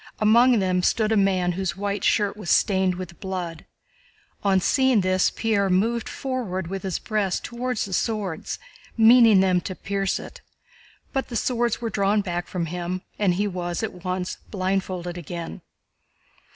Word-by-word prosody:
Among 235 +3 +5
them 185 -2 +1
stood 215 +4 +1
a - - +3
man 190 -3 +2
whose 185 +1 -3
white 200 0 -2
shirt 205 -2 +2
was 205 -5 -7
stained 190 -2 +3
with 180 -2 -8
blood. 180 -4 -5 0.8
On 195 -2 +3
seeing 260 +3 +3
this, 185 0 +2
Pierre 205 -4 0
moved 225 +5 +1
forward 235 -9 -3
with 190 +3 -5
his 190 -3 -2
breast 210 -4 -1
toward 250 +1 -3
the 195 -2 -2
swords, 200 -6 -2 0.4
meaning 225 -3 +7
them 185 -2 +2
to 185 - -5
pierce 195 0 -1
it. - - -10 0.7
But 270 -1 -1
the 240 - -7
swords 240 0 0
were 230 -1 -2
drawn 200 +1 +2
back 175 -3 -3
from 175 -2 -2
him 180 +2 -4 0.2
and 190 -4 +2
he 205 +3 0
was 175 0 -3
at 180 -5 -5
once 185 0 -3
blindfolded 185 -2 -2
again. 170 0 -7
195 Hz, 160 wpm, -24 LUFS, 180-215 Hz, 0.8 s, meaning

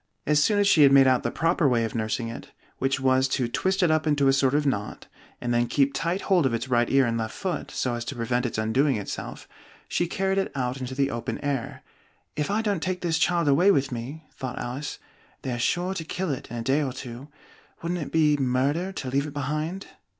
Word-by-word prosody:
As 150 0 +3
soon 205 +7 +3
as 205 -1 +3
she 170 -6 +5
had 140 -2 +7
made 135 -1 +7
out 130 -1 +4
the 120 - -1
proper 165 +1 +1
way 115 -2 +2
of 110 - -5
nursing 115 +1 -2
it, 115 - -8 0.3
(which 135 +1 0
was 130 0 +3
to 130 -2 0
twist 190 - 0
it 170 - +4
up 155 0 +1
into 145 -2 +3
a 135 - +5
sort 135 0 +2
of 150 0 +1
knot, 105 -7 -2 0.3
and 120 -1 -2
then 120 0 +2
keep 140 +1 +2
tight 175 +4 -1
hold 180 -8 +3
of 115 - -1
its 115 +3 -4
right 120 -2 +2
ear 135 -1 +4
and 115 -1 -1
left 110 -1 -4
foot, 180 -6 -3
so 125 - -2
as 120 0 -3
to - - -5
prevent 120 +1 0
its 115 - -5
undoing 125 +6 +2
itself), 105 -2 -6 0.4
she 175 - 0
carried 195 +2 0
it 195 - -2
out 130 0 -2
into 130 +1 -5
the 140 0 +1
open 115 0 -3
air. 140 -4 -3 0.5
"If 150 -1 -2
I 215 +2 0
don't 200 -6 0
take 185 0 -2
this 165 -2 0
child 170 -2 +2
away 155 +8 +5
with 140 -8 +2
me," 130 +7 -6
thought 130 -2 -6
Alice, 130 +4 -4 0.5
"they're 125 -2 -3
sure 180 +9 0
to 170 - -4
kill 180 +1 -3
it 135 - -5
in 120 - -6
a 115 - -3
day 135 +5 +2
or 135 -3 -2
two: 125 +1 -8 0.6
wouldn't 175 +1 -2
it 145 - -6
be 150 -2 +3
murder 140 +7 0
to 130 - -5
leave 140 +2 +1
it 145 - -9
behind?" 155 +7 -3
135 Hz, 240 wpm, -26 LUFS, 125-160 Hz, 0.6 s, had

